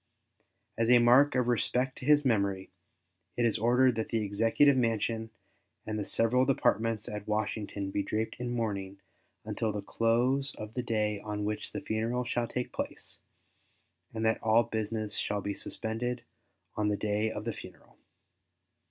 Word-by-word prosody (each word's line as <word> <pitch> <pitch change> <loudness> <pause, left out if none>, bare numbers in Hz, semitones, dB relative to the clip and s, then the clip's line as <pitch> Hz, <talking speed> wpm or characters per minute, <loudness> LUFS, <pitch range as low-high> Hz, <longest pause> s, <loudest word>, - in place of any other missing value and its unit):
As 115 0 +2
a 125 - +8
mark 125 +5 +5
of 125 -1 +2
respect 125 +3 0
to 130 - -8
his 150 -1 +5
memory, 100 -5 0 0.7
it 120 - +2
is 115 -1 +1
ordered 125 +3 +4
that 110 - -2
the 115 -2 0
Executive 115 +8 +3
Mansion 115 -2 0 0.6
and 110 0 -3
the 100 - -4
several 125 +3 +2
Departments 115 -5 +1
at 105 0 -6
Washington 105 -2 -2
be 100 - 0
draped 110 +3 -2
in 125 0 -3
mourning 100 -5 -3 0.5
until 110 - -1
the 105 -1 -4
close 120 +6 +1
of 110 0 -8
the 125 - -2
day 105 -3 -1
on 105 0 -4
which 105 0 -3
the - - -5
funeral 115 +3 -1
shall 120 0 -1
take 125 +1 -4
place, - - -6 0.9
and 110 0 -3
that 110 - +2
all 110 +1 +4
business 110 -1 -3 0.2
be 100 - -2
suspended 120 +4 -3 0.5
on 105 -1 0
the 105 -1 +1
day 105 +1 0
of 110 -1 -6
the 115 - -2
funeral. - - -13
110 Hz, 160 wpm, -30 LUFS, 105-120 Hz, 0.9 s, a